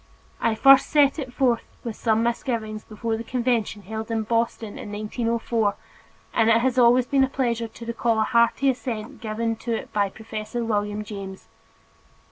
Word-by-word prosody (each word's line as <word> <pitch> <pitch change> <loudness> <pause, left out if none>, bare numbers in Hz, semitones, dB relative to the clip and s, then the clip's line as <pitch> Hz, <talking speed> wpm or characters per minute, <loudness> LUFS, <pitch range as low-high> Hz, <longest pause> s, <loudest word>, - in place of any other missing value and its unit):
I 225 - +1
first 270 +3 +7
set 290 0 +3
it 260 -4 -5
forth 245 -3 +2 0.2
with 230 -3 -4
some 225 -1 +1
misgiving 230 -3 -2
before 225 +1 -2
the 230 - -5
Convention 235 -4 -1
held 220 +3 -6
in 225 -1 0
Boston 230 -1 -1
in 205 - -7
1904 225 0 -1 0.6
and 225 0 +3
it 230 +2 +4
is 260 -1 +2
always 245 +1 +5
a 270 -1 +5
pleasure 235 -4 -1
to 230 +1 -11
recall 235 0 0
the 220 - +2
hearty 235 +4 +3
assent 235 -4 -6
given 225 0 -2
to 235 0 -2
it - - -7
by 205 -1 +1
Professor 220 +2 -5
William 210 -1 -1
James. 195 -2 -8
230 Hz, 165 wpm, -24 LUFS, 215-240 Hz, 0.6 s, first